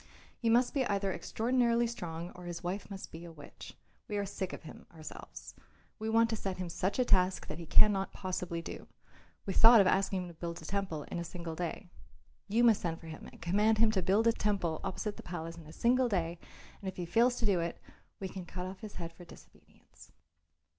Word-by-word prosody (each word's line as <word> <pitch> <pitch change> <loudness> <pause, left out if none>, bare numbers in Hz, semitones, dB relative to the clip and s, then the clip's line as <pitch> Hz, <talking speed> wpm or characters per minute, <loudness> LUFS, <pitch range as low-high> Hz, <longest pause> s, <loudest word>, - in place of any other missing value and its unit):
He 230 - 0
must 245 +4 +4
either 200 -7 +1
be - - -3
extraordinarily 235 0 +2
strong 175 -7 -5
or 180 0 -11
his 175 0 -5
wife 185 +4 -3
must 195 -2 -7
be 165 +1 -8
a 170 - -9
witch. 150 -3 -11 0.3
We 210 - -2
are 200 - 0
sick 190 -1 -4
of - - -8
him 160 - -11
ourselves. 160 -2 -9 0.5
We 220 +1 -2
want 230 +1 +4
to - - +1
set 195 -3 -3
him 180 -1 -4
such 185 +4 -1
a 250 - +3
task 185 -3 +3
that 155 - -6
he 170 - -7
cannot 195 0 +5
possibly 180 -3 -3
do. - - -7 0.6
We 195 - -2
thought 230 +3 +9
of 200 - +6
asking 190 0 +2
him - - -7
to - - -10
build 170 +1 -5
a 160 - -11
temple 190 -5 -2
in 175 - -5
a - - -2
single 170 -1 -6
day. 175 +2 -4 0.6
You 225 +4 +3
must 225 -4 +6
send 165 -3 -2
for - - -13
him 155 - -8
and - - -13
command 210 +5 +3
him 220 0 +5
to 195 -3 +1
build 195 +6 +3
a 230 - +5
temple 195 -8 0
opposite 205 +2 -3
the - - -7
palace 165 -1 -6
in 160 - -12
a - - -10
single 245 +7 +3
day, 170 -4 -1 0.4
and 195 - -3
if 190 - -9
he 175 - -2
fails 235 +8 +3
to 235 - -2
do 195 -4 +3
it, 170 0 -3 0.4
we 195 - -3
can 190 0 -7
cut 180 0 -5
off 185 +1 -7
his 215 -2 -9
head 165 -1 -6
for 175 - -13
disobedience." 170 - -17
190 Hz, 230 wpm, -32 LUFS, 170-215 Hz, 0.6 s, thought